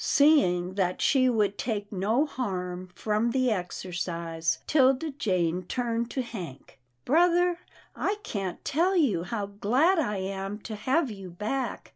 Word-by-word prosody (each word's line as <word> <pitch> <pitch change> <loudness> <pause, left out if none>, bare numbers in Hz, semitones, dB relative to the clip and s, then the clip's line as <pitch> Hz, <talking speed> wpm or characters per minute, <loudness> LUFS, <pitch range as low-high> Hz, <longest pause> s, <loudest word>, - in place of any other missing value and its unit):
Seeing 185 - +4
that 185 -2 0
she 255 -2 +4
would 210 -4 +1
take 210 -4 -3
no 215 +9 +1
harm 185 -9 -4
from 215 +2 0
the 255 0 +1
exercise, 170 -3 -2
'Tilda 270 +1 +3
Jane 180 - 0
turned 235 +4 -2
to 260 - -2
Hank, 175 - -9
" 120 0 -46
Brother, 350 +3 +3 0.4
I 405 - 0
can't 195 -4 -4
tell 345 +6 +2
you 230 - +2
how 205 +3 -3
glad 250 - +2
I 210 -9 0
am 195 +1 -4
to 220 - -6
have 265 +5 +1
you 195 -3 -8
back. 215 +9 -3
210 Hz, 145 wpm, -27 LUFS, 185-265 Hz, 0.4 s, Seeing